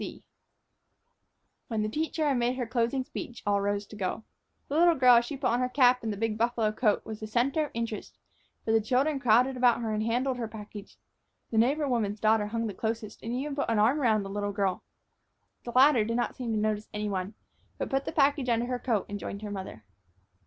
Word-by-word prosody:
S. - - -3
C." - - -11 1.4
When 220 -2 -1
the - - 0
teacher 310 +5 -1
had 275 -3 +2
made 240 +1 +1
her 255 -2 -2
closing 240 +3 0
speech, 240 -1 -8
all 200 -1 +2
rose 205 0 -1
to 215 - -12
go. 200 +2 -3 0.4
The 285 - -3
little 340 +1 +5
girl, 250 -3 +7
as 235 - +2
she 280 +3 -5
put 260 -3 0
on 240 - +1
her 250 0 0
cap 250 -1 +4
and 225 -2 -2
the 205 - -5
big 220 0 -2
buffalo 235 -2 +1
coat, 215 -1 +1
was 220 -1 -7
the 215 - -6
center 260 +7 +1
of - - -10
interest, 230 -2 -4 0.5
for 220 - 0
the 225 0 +4
children 270 +6 +1
crowded 250 +2 +3
about 245 -2 +4
her 220 -2 -2
and 215 - -1
handled 245 +4 0
her 235 -2 -3
package. 210 -1 -10 0.5
The 220 - +2
neighbor 285 +6 +2
woman's 215 -5 -1
daughter 215 -1 +3
hung 230 +2 -2
the 210 - -3
closest, 220 +1 -4
and 230 - -5
even 275 +4 -3
put 285 - -1
one 230 - +1
arm 240 +8 +3
around 220 -5 +2
the 195 - -7
little 205 0 -2
girl. 195 -3 -1 0.8
The 240 - -4
latter 260 -3 +6
did 230 +2 -2
not 240 - -1
seem 245 -3 -4
to 220 - 0
notice 215 0 -1
any 210 0 -3
one, 195 +1 -3 0.4
but - - -4
put 270 +1 0
the - - -3
package 280 -3 +2
under 235 0 +2
her 250 0 -3
coat 225 -7 0
and 205 0 -5
joined 200 +1 -6
her 210 - -5
mother. 190 - -7
230 Hz, 230 wpm, -28 LUFS, 215-255 Hz, 1.4 s, girl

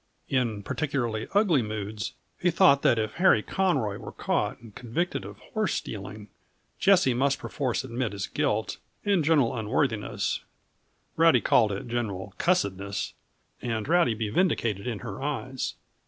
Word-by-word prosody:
In 115 -6 0
particularly 120 -5 -2
ugly 190 - +4
moods 110 0 -4 0.2
he 180 - +3
thought 165 -5 +5
that 120 - +4
if 110 -1 -1
Harry 185 +2 +5
Conroy 140 - 0
were - - -8
caught - - -1
and 115 -3 -14
convicted 125 - -2
of - - -9 0.2
horsestealing, 105 - -3 0.5
Jessie 185 -9 +5
must 135 +3 +2
perforce 130 -5 -2
admit 125 -2 -2
his 100 -1 -3
guilt 135 -8 -1 0.3
and 200 -5 +3
general 145 -7 +3
unworthiness 110 0 -1 0.8
Rowdy 165 -6 +6
called 110 -4 +4
it 100 +4 -4
general 100 -5 -3
cussedness 100 - 0 0.5
and 115 -2 -2
Rowdy 165 -8 +3
be 110 -1 -2
vindicated 115 - +1
in 115 -4 -2
her 105 +2 -6
eyes. 135 -2 -3
120 Hz, 140 wpm, -27 LUFS, 110-150 Hz, 0.8 s, Rowdy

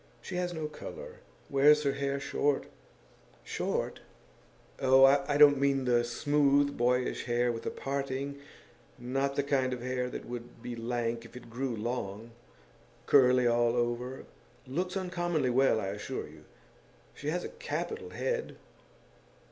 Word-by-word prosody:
She 185 - -7
has 180 0 -1
no 160 -3 -4
colour. 470 - -8 0.3
Wears 150 +2 +5
her 140 - +2
hair 140 0 -2
short.' 145 0 0 0.8
'Short?' - - -2 0.8
'Oh, 130 0 +6
I 140 +1 +3
don't 145 -2 +7
mean 135 -1 +2
the 120 -1 +3
smooth, 140 +3 +2
boyish 125 +1 0
hair 120 0 +1
with 115 -1 -5
a - - +2
parting 140 0 -3 0.6
not 135 +3 -1
the 140 - +1
kind 130 -2 +1
of 120 -1 -6
hair 125 0 -2
that - - -7
would 120 -1 -8
be 120 - -5
lank 115 0 -2
if - - -14
it 120 -2 -12
grew 125 0 -2
long. 110 -1 -4 0.7
Curly 125 -2 +5
all 120 0 +3
over. 120 +2 -2 0.4
Looks 180 +8 -2
uncommonly 175 -7 -1
well, 130 -2 +3
I 95 - -3
assure - - -5
you. - - -15 0.7
She 145 - -8
has 175 +3 -1
a - - -5
capital 460 -2 -5
head. 485 0 -3
135 Hz, 145 wpm, -30 LUFS, 120-145 Hz, 0.8 s, don't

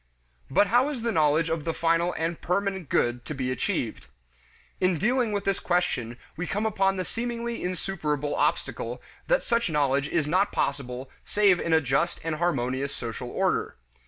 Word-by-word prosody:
But - - +4
how 245 +7 +3
is 260 -6 -4
the 235 - +1
knowledge 155 -2 +3
of 160 -1 -1
the 165 +1 -2
final 165 +1 +2
and 165 +1 -2
permanent 190 -3 -1
good 120 0 +1
to 150 - -5
be 130 -1 -1
achieved? 115 - -2 0.7
In 185 -2 +2
dealing 240 - +2
with 205 -1 -2
this 195 - +1
question 130 -10 0 0.2
we 180 +3 -3
come 205 +2 -1
upon 195 -3 +2
the 185 - -2
seemingly 235 0 -3
insuperable 155 -6 -2
obstacle - - -1 0.3
that - - +3
such 235 -4 +1
knowledge 140 -2 +2
is 160 -4 +1
not 185 +6 +2
possible 130 -1 -2
save 200 -4 +3
in 170 - -2
a 160 0 +5
just 140 +5 0
and 160 -1 -2
harmonious 140 -4 0
social 115 -2 -5
order. - - 0
170 Hz, 170 wpm, -27 LUFS, 145-200 Hz, 0.7 s, a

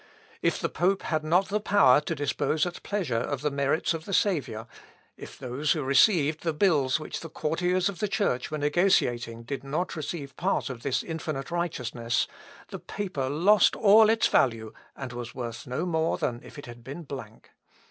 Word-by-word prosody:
If - - +1
the - - 0
pope 190 +2 0
had 155 -2 -1
not 175 +5 +2
the 210 +1 0
power 200 -10 +5
to 165 +2 -3
dispose 145 +2 0
at 175 -1 -6
pleasure 180 - -2
of 140 +3 -3
the 150 0 0
merits 140 +4 0
of 160 0 -6
the 195 - -1
Saviour; 130 - 0 0.5
if - - -11
those 130 +4 -1
who 155 -4 -3
received 150 +3 +3
the 165 -2 -1
bills 150 -7 +2
which 155 - -6
the 165 - -8
courtiers 175 +4 0
of 195 -4 -5
the 210 - 0
Church 195 - -1
were 155 - -3
negotiating 135 -8 +1
did 135 +2 -5
not 155 +7 -2
receive 150 -3 -5
part 180 -5 0
of 120 -2 -8
this 135 -1 -1
infinite 155 -3 -5
righteousness, 125 -9 -1 0.4
the - - -7
paper 180 -10 -4
lost 185 +9 +4
all 215 0 +6
its 225 0 +3
value, 115 -4 +1 0.2
and 130 -3 -7
was 120 0 -7
worth 120 -2 -6
no 125 +7 -2
more 160 -2 0
than 120 0 -2
if - - -13
it 145 - -8
had 120 -1 -11
been 140 +7 -7
blank. 130 -7 -9
150 Hz, 190 wpm, -27 LUFS, 130-175 Hz, 0.5 s, all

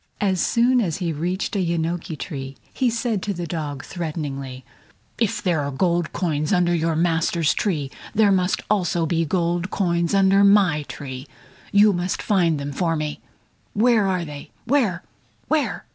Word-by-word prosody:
As 190 -4 +1
soon 245 +1 +3
as 175 -6 -1
he 175 -4 -2
reached 180 +7 -2
a - - +1
yenoki 170 -2 -2
tree, 135 -6 -6 0.2
he 255 -2 +1
said 230 -3 -1
to 200 0 -3
the 175 0 -4
dog, 150 -4 -4
threateningly: 140 -7 -5 0.5
"If 225 +1 0
there 170 -6 +1
were 140 - -2
gold 170 +4 0
coins 155 -4 -1
under 175 -2 +3
your 165 -1 +1
master's 165 -1 +1
tree, 150 -9 -1 0.2
there 210 -2 +5
must 185 -1 +1
also 175 -5 +1
be 165 0 0
gold 175 +2 0
coins 170 -2 0
under 195 0 +5
my 200 -6 +5
tree. 130 -1 -7 0.4
You 205 0 +6
must 175 +1 -2
find 170 -7 +2
them 140 0 -4
for 165 +3 0
me! 155 -1 -4 0.5
Where 220 -1 +3
are 180 -2 0
they? 145 -2 -9 0.2
Where? 235 -9 +1 0.5
Where?" 310 -2 0
175 Hz, 160 wpm, -22 LUFS, 155-195 Hz, 0.5 s, You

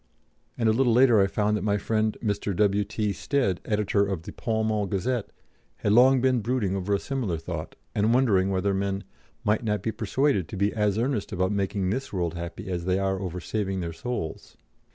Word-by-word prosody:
And 115 - +1
a 110 - +5
little 120 0 +3
later 120 -3 +6
I 95 - +4
found 105 +1 0
that 105 - -2
my 105 -1 +2
friend 110 +1 0
Mr. 100 -2 -1
W.T. 105 +1 +1
Stead, 115 - 0
editor 105 -1 +1
of 95 -5 -2
the - - -7
Pall 110 -1 -1
Mall 105 -2 0
Gazette, 110 +4 -1 0.5
had 105 - 0
long 130 +3 +6
been 130 -1 +3
brooding 110 -4 0
over 100 +1 0
a - - -1
similar 120 -11 -2
thought, 80 -1 -6 0.2
and 105 +2 +2
wondering 110 -7 +3
whether 100 +1 +1
men 100 +1 -1 0.4
'might 105 +1 +1
not 105 -3 -1
be 110 - 0
persuaded 110 - 0
to 100 - -7
be 100 +2 +1
as 105 -2 +1
earnest 120 -2 -1
about 95 +1 0
making 100 -1 -1
this 130 +5 -3
world 85 -4 -1
happy 85 +1 -6
as 90 -2 -3
they 95 0 +2
are 95 -1 0
over 90 -2 -4
saving 95 0 -2
their 85 -1 -4
souls.' 100 -5 -5
105 Hz, 200 wpm, -26 LUFS, 95-110 Hz, 0.5 s, later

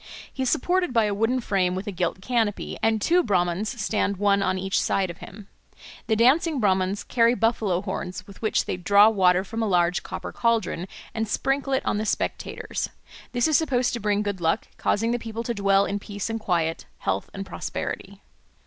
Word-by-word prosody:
He 265 - -5
is 260 - +1
supported 355 +2 +1
by 230 -2 +4
a 205 - 0
wooden 225 +5 +1
frame 185 -5 +1
with 190 +2 -4
a 205 - -3
gilt 180 0 -2
canopy, 225 -2 -1
and 225 0 +2
two 345 - +3
Brahmans 190 - 0
stand 200 -1 0
one 200 0 +3
on 185 -1 +1
each 190 +1 0
side 190 -2 0
of - - -14
him. 200 0 -11 0.6
The 220 - +2
dancing 275 +6 +3
Brahmans 190 -2 +1
carry 235 0 +3
buffalo 215 -6 +1
horns 185 -2 -5
with 200 -2 -14
which 220 - +1
they - - -3
draw 200 +4 +6
water 185 -3 +3
from 225 +3 -5
a 220 - +1
large 180 -2 +2
copper - - -6
caldron 225 -6 0 0.3
and 225 0 -2
sprinkle 270 +5 0
it 265 - 0
on 210 - 0
the 215 - -2
spectators; - - -2 0.4
this 245 +4 +2
is 310 - +4
supposed 255 -6 +1
to 240 - -2
bring 210 -1 +1
good 200 -3 -3
luck, 165 +6 +1
causing 225 +3 +1
the 240 - 0
people 230 0 -5
to 235 - -2
dwell 200 -1 +3
in 200 +1 -2
peace 205 +2 -5
and 225 - -2
quiet, 165 -5 -1
health 95 0 -2
and 195 0 -6
prosperity. - - -5
205 Hz, 200 wpm, -25 LUFS, 190-230 Hz, 0.6 s, draw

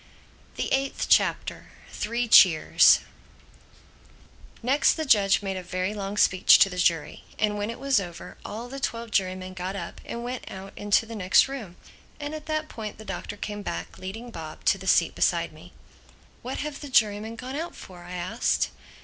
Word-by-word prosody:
THE - - -2
EIGHTH 270 0 -1
CHAPTER - - +2 0.2
THREE 235 +2 -2
CHEERS 180 -7 +7 1.6
NEXT 275 +6 +3
the 315 - -2
judge 205 -6 +4
made 195 -1 -3
a - - -4
very 185 +3 -3
long 200 0 -5
speech 185 -2 +6
to 195 - +4
the 180 - -6
jury; 165 -3 0
and 210 -1 +1
when 205 +1 -3
it 230 - -5
was 270 -3 +2
over 175 -3 -8
all 225 +4 -6
the 275 +2 -7
twelve 230 -3 -3
jurymen 185 -1 -1
got 185 +1 -5
up - - -7
and 235 0 -6
went 250 +1 -5
out 195 +1 -9
into 205 +2 +2
the 230 - -9
next 190 +2 +4
room. 235 -10 -7 0.4
And 290 +1 -5
at 310 0 -8
that 310 0 -1
point 215 -7 -7
the 220 - -11
Doctor 205 - -6
came 205 0 -5
back, - - -6
leading 225 +6 -7
Bob, 160 -5 -9
to 195 - +3
the 190 - -9
seat - - +4
beside - - +1
me. - - -15 0.7
"What 255 +2 -5
have 300 -1 -5
the 290 - -7
jurymen 220 -2 +2
gone 255 +3 -7
out 330 +3 -4
for?" 180 -2 -12
I 175 +1 -9
asked. 75 - 0
210 Hz, 185 wpm, -26 LUFS, 185-245 Hz, 1.6 s, CHEERS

